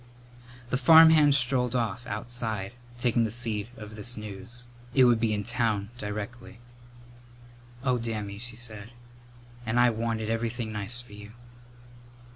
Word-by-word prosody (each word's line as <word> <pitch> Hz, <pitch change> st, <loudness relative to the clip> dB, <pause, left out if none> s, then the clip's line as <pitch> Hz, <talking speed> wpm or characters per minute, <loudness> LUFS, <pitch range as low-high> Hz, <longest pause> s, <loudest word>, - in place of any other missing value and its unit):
The 125 Hz, -, +2 dB
farmhand 160 Hz, 0 st, +8 dB
strolled 125 Hz, -1 st, +2 dB
off, 120 Hz, 0 st, -2 dB
outside, 110 Hz, -2 st, -4 dB, 0.2 s
taking 120 Hz, -1 st, +2 dB
the 110 Hz, -, 0 dB
seed 110 Hz, -2 st, -2 dB
of 105 Hz, 0 st, -9 dB
this 110 Hz, +3 st, -3 dB
news. 110 Hz, +4 st, -8 dB, 0.3 s
It 130 Hz, -, +6 dB
would 120 Hz, -2 st, +5 dB
be 115 Hz, -1 st, +1 dB
in 105 Hz, -1 st, -1 dB
town 115 Hz, -3 st, -1 dB
directly. 105 Hz, +3 st, -6 dB, 1.3 s
"Oh, 125 Hz, -2 st, +1 dB
Dammy," 105 Hz, -3 st, -4 dB
she 120 Hz, 0 st, -7 dB
said, 115 Hz, -2 st, -6 dB, 0.7 s
"and 120 Hz, +1 st, 0 dB
I 120 Hz, 0 st, +5 dB
wanted 110 Hz, -1 st, -2 dB
everything 115 Hz, 0 st, -2 dB
nice 105 Hz, +3 st, 0 dB
for 120 Hz, -4 st, -16 dB
you!" 105 Hz, +1 st, -11 dB
115 Hz, 135 wpm, -27 LUFS, 105-120 Hz, 1.3 s, farmhand